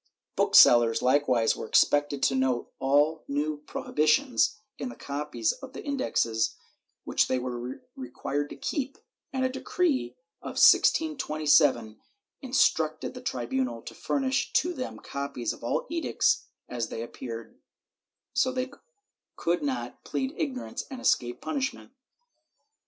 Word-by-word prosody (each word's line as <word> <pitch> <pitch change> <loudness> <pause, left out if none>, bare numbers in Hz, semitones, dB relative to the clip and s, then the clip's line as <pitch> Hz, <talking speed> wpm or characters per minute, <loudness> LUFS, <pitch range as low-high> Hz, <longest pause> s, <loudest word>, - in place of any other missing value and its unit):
^ - - -51
Book - - +1
sellers 120 -1 +7
likewise 125 -3 +3
were - - -6
expected 145 +2 +3
to - - +3
note 130 -2 0
all 145 +4 +2
new 150 +2 -1
prohibitions 210 - +1 0.2
in 255 - -3
the - - -9
copies 140 -5 -2
of 265 -1 -10
the - - -8
Indexes 115 - 0 0.5
which - - +1
they 130 - +1
were 125 0 -4 0.2
required 145 - -4
to - - -8
keep, 275 -2 -3 0.3
and 260 -1 0
a - - +2
decree 265 - -1 0.3
of - - -7
1627 150 - +4 0.4
instructed 160 - +1
the 250 - -9
tribunal 125 - -2
to - - -8
furnish 270 -1 -1
to 355 +2 +2
them 255 -5 -5
copies 140 -4 -4
of - - -14
all 120 - -1
edicts 330 +2 0 0.2
as 120 -2 -3
they 115 - -4
appeared, 115 -1 -8 0.7
so 260 0 +2
that 255 +1 -3
they 280 - -16 0.6
could 170 +1 0
not 280 -3 -4
plead 265 +1 -3
ignorance 265 -5 -4
and 265 - -7
escape 120 - +1
punishment. 270 -4 -3
150 Hz, 135 wpm, -28 LUFS, -, 0.7 s, sellers